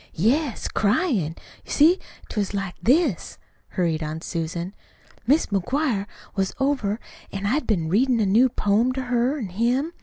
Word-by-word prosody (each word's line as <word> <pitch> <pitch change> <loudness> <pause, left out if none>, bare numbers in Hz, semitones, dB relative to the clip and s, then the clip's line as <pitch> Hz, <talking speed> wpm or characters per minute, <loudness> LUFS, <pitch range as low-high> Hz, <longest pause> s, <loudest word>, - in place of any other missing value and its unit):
"Yes, 245 - +1
cryin'. 205 - +1 0.3
You - - -11
see, 330 +6 +5 0.3
't - - -9
was 205 -1 -1
like 195 -2 -2
this," 265 - +2 0.3
hurried 165 -3 -1
on 155 +1 -4
Susan. 170 +2 -4 0.5
"Mis' 290 +5 +4
McGuire 210 - 0 0.3
was 190 -1 -1
over, 260 -7 0 0.3
an' 195 0 -4
I'd 265 +9 0
been 175 -8 +1
readin' 235 +7 +3
a 215 - +3
new 225 +7 +5
poem 225 +3 +2
to 265 - -2
her 245 +3 +1
an' 220 -9 -4
him. 245 - 0
220 Hz, 155 wpm, -24 LUFS, 190-265 Hz, 0.5 s, see